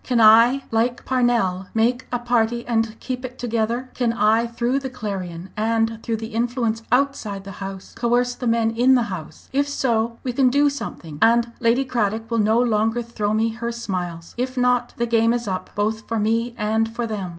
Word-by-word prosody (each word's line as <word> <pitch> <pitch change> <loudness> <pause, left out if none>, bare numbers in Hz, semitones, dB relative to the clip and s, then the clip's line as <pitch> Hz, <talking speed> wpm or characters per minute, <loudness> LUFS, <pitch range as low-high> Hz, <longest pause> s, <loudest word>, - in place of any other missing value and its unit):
"Can 245 -2 +1
I 230 +5 +6
like 235 +2 0
Parnell 235 -8 +1
make 245 +3 +1
a 245 - +1
party 240 -1 0
and 225 -2 -1
keep 255 -1 -5
it 255 0 -7
together? 235 +1 -2
Can 245 -2 0
I 225 +1 +3
through 235 +3 -1
the 265 -1 -5
Clarion 190 -7 -6
and 225 +1 0
through 225 -1 -2
influence 230 0 -1
outside 250 -7 0
the 195 - -8
House 195 -1 -7
coerce 245 +1 +1
the 245 - -4
men 230 -1 +2
in 245 +3 +4
the 245 - +3
House? 160 -4 -9
If 285 +1 +1
so, 230 -4 0
we 250 - -2
can 255 0 +4
do 285 +2 +3
something, 165 - -7
and 235 +1 +4
Lady 240 +3 +2
Cradock 225 -2 -1
will 230 - +1
no 220 +2 +3
longer 225 0 +1
throw 215 -2 -2
me 225 +1 +2
her 235 +1 -4
smiles. 180 -7 -5
If 255 +1 -2
not 250 -1 +1
the 235 - +1
game 230 0 +3
is 240 -2 -2
up, 185 -1 -3
both 215 +1 -1
for 230 - -1
me 230 +3 0
and 220 +1 0
for 240 - -1
them. 205 -5 -4
230 Hz, 195 wpm, -22 LUFS, 220-245 Hz, -, I